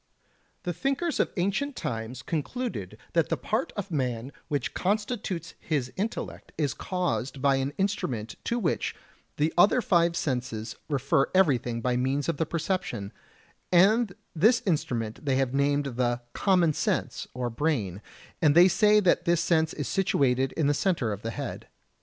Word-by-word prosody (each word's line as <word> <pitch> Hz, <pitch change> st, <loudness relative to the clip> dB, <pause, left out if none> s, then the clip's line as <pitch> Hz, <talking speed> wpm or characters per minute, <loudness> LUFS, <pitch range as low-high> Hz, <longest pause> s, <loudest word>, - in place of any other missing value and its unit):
The 175 Hz, -, -2 dB
thinkers 275 Hz, -, -1 dB
of -, -, +2 dB
ancient 205 Hz, +10 st, 0 dB
times 115 Hz, -, -4 dB
concluded 235 Hz, -, -3 dB, 0.2 s
that -, -, +2 dB
the -, -, 0 dB
part -, -, -1 dB
of 200 Hz, -2 st, -4 dB
man 125 Hz, -3 st, -2 dB, 0.2 s
which 145 Hz, -5 st, -2 dB
constitutes 200 Hz, -4 st, -2 dB
his 140 Hz, -6 st, -2 dB
intellect 215 Hz, +4 st, -4 dB
is 145 Hz, -6 st, 0 dB
caused 170 Hz, -8 st, -2 dB
by 135 Hz, 0 st, +3 dB
an 135 Hz, +1 st, -1 dB
instrument 135 Hz, -, -1 dB
to 235 Hz, -, 0 dB
which 185 Hz, -9 st, -1 dB, 0.4 s
the 155 Hz, +2 st, +1 dB
other 205 Hz, +7 st, +6 dB
five 170 Hz, -6 st, +3 dB
senses 125 Hz, -7 st, -2 dB
refer 140 Hz, -1 st, +2 dB
everything 125 Hz, -10 st, +2 dB
by 125 Hz, +1 st, +1 dB
means 135 Hz, +3 st, 0 dB
of 165 Hz, -3 st, 0 dB
the 160 Hz, -, 0 dB
perception, 170 Hz, -, -2 dB, 0.6 s
and 200 Hz, +3 st, +4 dB, 0.2 s
this 220 Hz, +9 st, +4 dB
instrument 145 Hz, -, -1 dB
they 135 Hz, -3 st, +1 dB
have 135 Hz, -1 st, +1 dB
named 140 Hz, +1 st, +2 dB
the 120 Hz, -2 st, -1 dB
"common 180 Hz, -5 st, +3 dB
sense" -, -, -1 dB
or 125 Hz, -1 st, -2 dB
brain, 115 Hz, -, -1 dB, 0.4 s
and 150 Hz, -3 st, +4 dB
they 175 Hz, +2 st, +9 dB
say 210 Hz, +3 st, +5 dB
that 185 Hz, -, +2 dB
this 170 Hz, -1 st, +3 dB
sense 160 Hz, -2 st, +2 dB
is 145 Hz, -, -4 dB
situated 135 Hz, -9 st, +2 dB
in 160 Hz, -, 0 dB
the 145 Hz, -, +3 dB
centre 145 Hz, -, 0 dB
of 100 Hz, -, -7 dB
the 115 Hz, -, -3 dB
head. 135 Hz, +2 st, -5 dB
155 Hz, 160 wpm, -27 LUFS, 125-185 Hz, 0.6 s, they